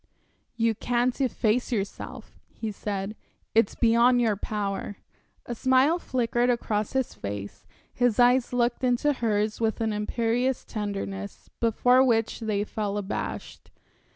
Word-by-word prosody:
"You 230 -1 +2
can't 245 +4 0
efface 245 -1 +1
yourself," 220 +3 -5
he 220 -1 -5
said. 200 0 -4 0.4
"It's 225 -2 +3
beyond 235 +2 +4
your 225 -3 +2
power." 205 0 -3 0.5
A 240 - -4
smile 260 +7 +3
flickered 245 -3 0
across 215 -3 -1
his 265 -2 0
face, 100 0 -7 0.3
his 245 -3 +2
eyes 245 +1 +4
looked 240 0 0
into 255 +4 +2
hers 215 -3 -1
with 220 -1 0
an 220 -1 0
imperious 235 +4 0
tenderness, 200 -1 -5
before 245 +3 +4
which 225 -3 +1
they 215 -3 -1
fell 210 -1 -3
abashed. 205 0 -5
230 Hz, 125 wpm, -26 LUFS, 210-245 Hz, 0.5 s, beyond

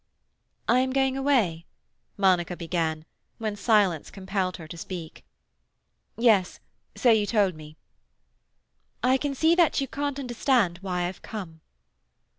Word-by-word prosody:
"I 245 - +4
am 260 0 0
going 265 -1 +2
away," 235 - +1 0.5
Monica 180 -3 +2
began, 165 -2 -2 0.3
when 215 -2 -3
silence 200 -7 +2
compelled 190 -1 -3
her 160 -3 -10
to 165 - -8
speak. 170 -1 -8 0.9
"Yes, 220 -6 +3 0.4
so 245 - +4
you 215 -2 +3
told 205 -5 +2
me." 155 0 -13 1.3
"I 255 +1 +4
can 280 0 -3
see 320 +5 +4
that 340 -3 +3
you 275 - -1
can't 285 +1 -3
understand 240 -8 +1
why 185 -2 -3
I - - 0
have 180 +1 -6
come." 175 -8 -8
200 Hz, 135 wpm, -26 LUFS, 175-255 Hz, 1.3 s, I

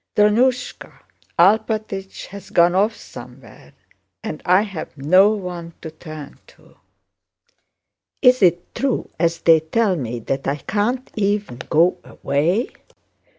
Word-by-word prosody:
"Drónushka, 240 +5 +1 0.4
Alpátych 195 +1 +1
has 200 0 -11
gone 170 +1 +4
off 210 +4 +2
somewhere - - -13 0.5
and - - -6
I 185 +3 +4
have 195 -8 -8
no 185 +9 +5
one 180 -5 -5
to 160 - -7
turn 155 -2 -10
to. - - -22 1.4
Is 250 -2 +4
it 175 -2 +2
true, 270 -3 -2
as 170 0 0
they 165 -1 +6
tell 190 +5 0
me, 120 -6 -4
that 135 +4 -3
I 140 - 0
can't 215 - -2
even 205 - -1
go 175 +3 +3
away?" 170 - -1
185 Hz, 120 wpm, -20 LUFS, 165-215 Hz, 1.4 s, they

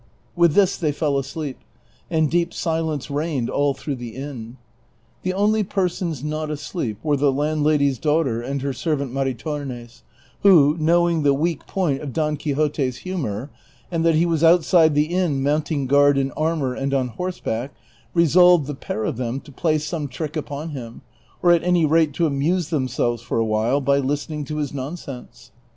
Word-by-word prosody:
With 170 -3 +4
this 200 -3 +4
they 155 -3 0
fell 145 -1 -1
asleep, 135 0 -5 0.5
and 160 -2 +2
deep 170 +3 0
silence 160 -4 -2
reigned 145 -4 -1
all 145 -1 +1
through 135 0 -4
the 120 -2 -8
inn. 130 -3 -7 0.6
The 185 - -1
only 210 +2 +2
persons 180 -6 -2
not 155 0 -3
asleep 145 - -4
were 150 -2 +2
the 140 0 +3
land 150 +2 0
lady's 140 -4 +2
daughter 150 -7 +1
and 135 +2 -4
her 140 -1 -1
servant 140 -2 -2
Maritornes, 130 -2 -4 0.4
who, 155 -7 +6
knowing 170 +1 +3
the 140 -1 +3
weak 160 +2 -2
point 165 -8 -1
of 140 -4 -6
Don 150 -1 0
Quixote's 145 -3 -1
hiunor, 140 - -4 0.4
and 165 -2 0
that 165 -1 +3
he 165 +2 +3
was 165 -2 0
outside 165 -2 +5
the 150 +1 +3
inn 165 -7 +1
mounting 145 0 0
guard 145 +1 +4
in 135 0 0
armor 155 -5 -1
and 135 +2 -2
on 130 -2 0
horseback, 140 -6 -4 0.4
resolved, 175 -1 +5
the 150 - -4
pair 110 -5 -4
of - - -2
them, 125 +1 -2
to 145 - -15
play 155 +3 +1
some 155 0 -3
trick 150 +4 -5
upon 150 +1 -4
him, 120 -6 -8 0.4
or 175 - +6
at 170 -1 +4
any 175 -2 +3
rate 155 -1 +3
to 170 - +1
amuse 155 +4 0
themselves 125 -5 -1
for - - -3
a 115 - +2
while 110 +5 +1
by 140 0 +2
listening 145 +2 -2
to 150 +2 -5
his 145 -2 -3
nonsense. 130 -4 -8
145 Hz, 175 wpm, -22 LUFS, 135-165 Hz, 0.6 s, who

